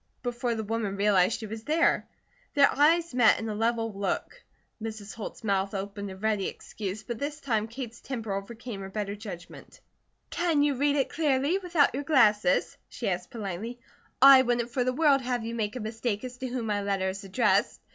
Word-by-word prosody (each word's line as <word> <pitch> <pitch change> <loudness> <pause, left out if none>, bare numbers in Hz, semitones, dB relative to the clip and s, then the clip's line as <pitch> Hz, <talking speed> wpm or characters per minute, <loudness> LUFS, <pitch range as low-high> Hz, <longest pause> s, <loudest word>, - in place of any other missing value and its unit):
before 240 -1 -1
the 220 - -3
woman 215 -2 -2
realized 200 0 +3
she 225 - -6
was 220 +1 -7
there. 320 +2 +2 0.5
Their 280 -1 +5
eyes 325 +2 +3
met 245 -3 +5
in 225 - -4
a 215 - -2
level 225 0 0
look. 195 -1 -3 0.4
Mrs. 215 -2 -6
Holt's 225 0 -8
mouth 195 -1 0
opened 200 +1 -5
in 190 - -8
ready 215 -3 +1
excuse, 205 0 -6
but 235 -1 -5
this 290 +1 -4
time 220 -6 -1
Kate's 235 0 -7
temper 225 -6 -4
overcame 220 +2 -6
her 195 - -6
better 205 0 -3
judgment. 200 -5 -10 0.5
"Can 335 -4 +2
you 290 -1 +2
read 285 +2 +1
it 275 -2 +1
clearly, 295 +3 +1
without 345 -6 +2
your 280 +3 -3
glasses?" 265 -3 +3
she - - -3
asked - - -3
politely. 225 +1 -5 0.4
"I 270 0 +9
wouldn't 240 -1 0
for 250 +1 0
the 255 - +1
world 280 0 +3
have 245 -2 -2
you 230 - -4
make 220 -1 -2
a - - -3
mistake 220 0 -3
as 250 -1 -6
to 260 - -4
whom 245 -2 -3
my 205 -2 0
letter 195 -1 0
is 195 +2 -6
addressed. 195 0 +1
230 Hz, 195 wpm, -28 LUFS, 205-260 Hz, 0.5 s, I